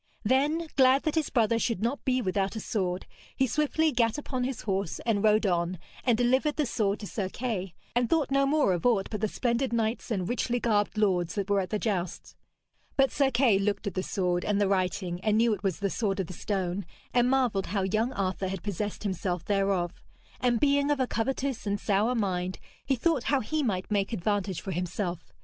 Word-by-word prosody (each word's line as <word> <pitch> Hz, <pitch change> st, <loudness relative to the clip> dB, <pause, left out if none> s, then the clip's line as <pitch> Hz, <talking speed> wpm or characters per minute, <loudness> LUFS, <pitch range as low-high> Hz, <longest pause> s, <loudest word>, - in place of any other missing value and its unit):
Then, 290 Hz, +8 st, +2 dB
glad 265 Hz, +1 st, +5 dB
that 310 Hz, -, 0 dB
his 320 Hz, -3 st, 0 dB
brother 230 Hz, -2 st, +2 dB
should 225 Hz, -4 st, -1 dB
not 245 Hz, +5 st, -1 dB
be 255 Hz, -1 st, +1 dB
without 195 Hz, +1 st, 0 dB
a -, -, -2 dB
sword, 185 Hz, -4 st, -2 dB, 0.3 s
he 265 Hz, -, +3 dB
swiftly 300 Hz, +5 st, +1 dB
gat 230 Hz, -2 st, +1 dB
upon 260 Hz, -3 st, -3 dB
his 260 Hz, -3 st, -3 dB
horse 195 Hz, -4 st, -2 dB
and 220 Hz, -3 st, +1 dB
rode 215 Hz, +1 st, +4 dB
on, 175 Hz, -1 st, 0 dB, 0.3 s
and 240 Hz, -3 st, +3 dB
delivered 260 Hz, +5 st, +2 dB
the 300 Hz, -, +1 dB
sword 210 Hz, -4 st, 0 dB
to -, -, -5 dB
Sir 195 Hz, -2 st, -3 dB
Kay, 195 Hz, -6 st, -3 dB, 0.2 s
and 240 Hz, -1 st, +2 dB
thought 310 Hz, -4 st, +1 dB
no 275 Hz, 0 st, +3 dB
more 285 Hz, -9 st, +3 dB
of 175 Hz, -, -2 dB
aught 225 Hz, -6 st, +2 dB
but 210 Hz, -2 st, -3 dB
the 215 Hz, -, +2 dB
splendid 240 Hz, +4 st, 0 dB
knights 230 Hz, +1 st, -1 dB
and 190 Hz, -6 st, -1 dB
richly 245 Hz, +1 st, 0 dB
garbed 210 Hz, -3 st, +1 dB
lords 185 Hz, -5 st, +1 dB
that 200 Hz, -1 st, -2 dB
were 200 Hz, -, +4 dB
at 185 Hz, -, -2 dB
the 215 Hz, -, 0 dB
jousts. 190 Hz, -5 st, -3 dB, 0.6 s
But 270 Hz, -1 st, +4 dB
Sir 280 Hz, -2 st, +2 dB
Kay 240 Hz, -6 st, +3 dB
looked 205 Hz, +2 st, -1 dB
at 200 Hz, -, -2 dB
the 185 Hz, -, -1 dB
sword, 180 Hz, -2 st, -1 dB
and 205 Hz, -1 st, +1 dB
the 205 Hz, -, +3 dB
writing, 185 Hz, -2 st, 0 dB
and 215 Hz, +1 st, +2 dB
knew 230 Hz, 0 st, +4 dB
it 200 Hz, -, -4 dB
was 195 Hz, -4 st, -1 dB
the 200 Hz, 0 st, -1 dB
sword 205 Hz, -3 st, -1 dB
of 190 Hz, -, 0 dB
the 185 Hz, -, -8 dB
stone, 190 Hz, 0 st, -2 dB, 0.3 s
and 245 Hz, 0 st, +4 dB
marvelled 250 Hz, -7 st, +1 dB
how 195 Hz, +1 st, -1 dB
young 215 Hz, +6 st, +1 dB
Arthur 190 Hz, -1 st, -1 dB
had 190 Hz, -2 st, -4 dB
possessed 205 Hz, +1 st, -3 dB
himself 180 Hz, -3 st, -2 dB
thereof; 195 Hz, -3 st, 0 dB, 0.4 s
and 240 Hz, -2 st, +2 dB
being 285 Hz, +1 st, +3 dB
of 290 Hz, -2 st, +1 dB
a 260 Hz, -, +3 dB
covetous 260 Hz, 0 st, -2 dB
and 200 Hz, 0 st, 0 dB
sour 210 Hz, +5 st, +1 dB
mind 185 Hz, -4 st, -1 dB, 0.3 s
he 270 Hz, -, +1 dB
thought 280 Hz, 0 st, +1 dB
how 280 Hz, -, +2 dB
he 310 Hz, +6 st, -1 dB
might 200 Hz, -7 st, -2 dB
make 200 Hz, +2 st, 0 dB
advantage 200 Hz, -2 st, -1 dB
for 195 Hz, -, -5 dB
himself. 180 Hz, 0 st, -3 dB
210 Hz, 215 wpm, -28 LUFS, 190-250 Hz, 0.6 s, glad